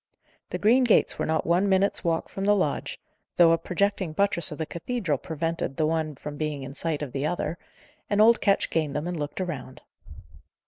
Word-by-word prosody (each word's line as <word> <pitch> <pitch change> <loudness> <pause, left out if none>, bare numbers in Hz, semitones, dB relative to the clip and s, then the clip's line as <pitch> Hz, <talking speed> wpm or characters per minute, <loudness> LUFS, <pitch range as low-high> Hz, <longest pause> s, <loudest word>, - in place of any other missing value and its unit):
The - - -3
green 240 +5 +4
gates 240 - +3
were - - -1
not 160 0 0
one 180 +4 +2
minute's 195 +1 +2
walk 165 -2 0
from 195 - -5
the 205 0 +5
lodge 170 -8 -1 0.4
though 170 -2 +7
a 165 - +4
projecting 185 -1 -1
buttress 200 -1 0
of 150 - -6
the 160 - -2
cathedral 170 - -2
prevented 160 -2 -3
the 155 - +2
one 155 -1 -1
from 145 +2 -7
being 150 -2 -3
in 135 +1 -7
sight 155 0 -2
of 140 - -6
the 140 +3 -1
other 170 -1 -3 0.5
and 205 - +1
old 225 +2 +6
Ketch 200 -1 +2
gained 155 -4 -1
them, 150 +2 -2
and 175 0 -3
looked 145 +4 -4
around. 135 -9 -5
165 Hz, 200 wpm, -26 LUFS, 150-195 Hz, 0.5 s, though